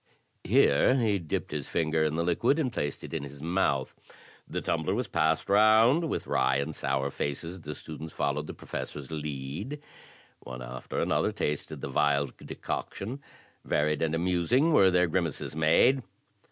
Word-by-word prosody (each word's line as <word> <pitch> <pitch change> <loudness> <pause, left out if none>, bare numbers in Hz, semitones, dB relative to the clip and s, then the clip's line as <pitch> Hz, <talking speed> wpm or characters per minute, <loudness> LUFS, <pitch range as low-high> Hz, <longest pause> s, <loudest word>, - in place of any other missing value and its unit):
Here 70 - +4
he 110 -6 +2
dipped 80 -3 -3
his - - -4
finger 80 -1 +1
in 75 0 0
the 85 - 0
liquid, 90 - +2
and 130 -7 -1
placed 75 - -3
it - - -8
in 80 - -1
his 70 0 -9
mouth. 80 -6 0 0.5
The - - -3
tumbler 85 +4 -1
was 125 +2 -1
passed 80 -1 +1
round. 110 +10 +5
With - - -2
wry 65 0 +2
and 70 +3 -2
sour 70 +1 -1
faces 85 +7 -4
the 75 -1 -6
students 80 +2 -8
followed 75 +2 -1
the - - -7
Professor's 70 -2 -6
lead. 75 - -5 0.6
One 65 -1 -8
after - - -5
another - - +1
tasted 75 -1 -3
the - - -3
vile 70 -2 +2
decoction; 125 +8 -5 0.4
varied 75 0 0
and 80 0 +1
amusing 90 - +2
were 95 -9 +6
the 90 -1 +3
grimaces 85 -4 -2
made. 80 - +4
80 Hz, 160 wpm, -28 LUFS, 75-100 Hz, 0.6 s, were